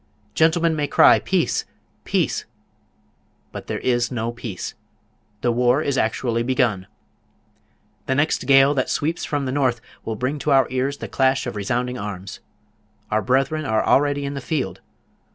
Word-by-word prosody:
Gentlemen 165 +2 +3
may 150 -1 -1
cry - - +6
"Peace, - - 0 0.4
peace!" - - 0 1.1
but - - -8
there - - -2
is 120 -1 +1
no 115 -1 -2
peace! 115 -6 -6 0.7
The 120 - +2
war 125 +4 +2
is 140 - -1
actually 115 0 0
begun! 120 -6 0 1.2
The 130 - +1
next 145 +3 0
gale 135 +1 +6
that 130 -3 -1
sweeps 160 +4 -1
from 145 -2 -2
the 130 - -2
north 130 -4 +1 0.2
will 110 - -3
bring 130 +6 -2
to 150 - -2
our 135 -1 +5
ears 130 +2 -1
the - - -6
clash 130 -1 +1
of 120 - -5
resounding 125 +5 -2
arms! 100 -2 -6 0.7
Our 110 +1 +2
brethren 135 +7 +1
are 110 -5 0
already 145 0 +2
in 140 - -3
the 140 - -5
field! 130 - -3
130 Hz, 155 wpm, -22 LUFS, 120-140 Hz, 1.2 s, cry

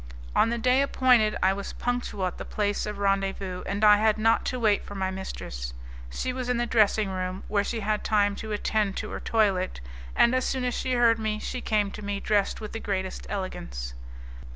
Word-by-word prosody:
On - - +4
the 235 - -1
day 250 +3 +3
appointed 250 -6 +3
I 190 +1 +4
was 200 0 -6
punctual 245 -6 -2
at 180 - -4
the - - -4
place 205 0 -1
of 210 -1 -4
rendezvous, 195 -2 -1
and 200 +2 -2
I 210 -1 +8
had 215 0 +3
not 225 +1 +3
to 255 - -2
wait 215 -3 +2
for 205 - -9
my 190 -1 -1
mistress. 60 - -6 0.3
She 255 - -3
was 255 -1 -4
in 250 - +1
the 240 - +1
dressing 215 -3 +3
room, 185 0 -3
where 205 -1 +1
she 225 +2 -3
had 210 +1 0
had - - -13
time 205 -2 +2
to 220 - -6
attend 210 -1 0
to 215 - -4
her - - -4
toilet, 195 -5 +1 0.4
and 235 - +5
as 255 0 +2
soon 260 -1 -1
as 250 -1 0
she 255 +2 -1
heard 235 -2 +4
me 215 -1 -1
she 250 +3 -5
came 210 -3 +1
to 210 - -8
me 200 0 -2
dressed 205 -1 +1
with 215 - -7
the 225 - -4
greatest 190 -3 -3
elegance. - - -5
210 Hz, 220 wpm, -27 LUFS, 195-230 Hz, 0.4 s, I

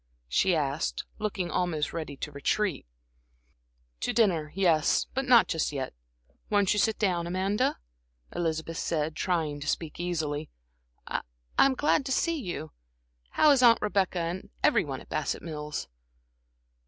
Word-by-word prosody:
she 175 - +3
asked, 145 0 -1 0.2
looking 200 -4 -2
almost 160 -5 -1
ready 155 -4 -5
to 150 - -5
retreat. 145 - -1 1.1
"To - - -1
dinner 175 -10 +2
yes; 170 -6 +3
but 270 +1 -1
not 245 -3 +6
just 160 -2 0
yet. 135 -3 -4 0.6
Won't 205 -2 +3
you 210 - 0
sit 220 +1 +2
down, 175 -5 0
Amanda?" 195 +7 0 0.6
Elizabeth 165 -1 -2
said, 155 -1 -1
trying 160 -5 -1
to 145 - -7
speak 160 +1 -2
easily. 155 -4 -2 0.6
"I - - -2 0.4
I'm 270 -1 +6
glad 295 +1 +2
to - - -3
see 335 +5 +1
you. 175 - -5 0.7
How 305 - +7
is 275 -3 +4
Aunt 235 -2 +7
Rebecca, 195 -3 0
and 170 +3 -4
every - - +4
one - - -5
at - - -16
Bassett - - -2
Mills?" 150 - -5
175 Hz, 145 wpm, -28 LUFS, 155-210 Hz, 1.1 s, How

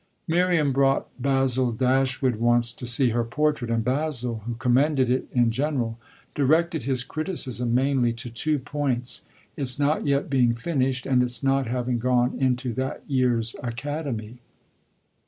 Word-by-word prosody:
Miriam 170 -3 +2
brought 135 0 +2
Basil 130 -2 +2
Dashwood 130 0 +1
once 120 +1 +3
to 120 +1 -7
see 120 +2 +3
her 120 +1 0
portrait, 140 +1 -1
and 115 -1 0
Basil, 125 -3 -2
who 120 - -3
commended 130 +2 +2
it 130 - 0
in 120 -2 +2
general, 125 -3 -2 0.3
directed 160 +4 +2
his 130 0 -1
criticism 130 -6 -2
mainly 130 -2 +2
to 115 +1 -6
two 150 +6 0
points 130 -3 -3 0.3
its 135 -3 +2
not 145 +1 0
yet 140 0 +1
being 125 -4 +2
finished 130 -1 -1
and 130 -2 +3
its 125 +2 -1
not 135 -1 +1
having 125 0 -1
gone 125 +1 +1
into 125 -2 0
that 130 +3 -4
year's 120 -4 +1
Academy. 120 -2 -5
130 Hz, 145 wpm, -25 LUFS, 120-140 Hz, 0.3 s, once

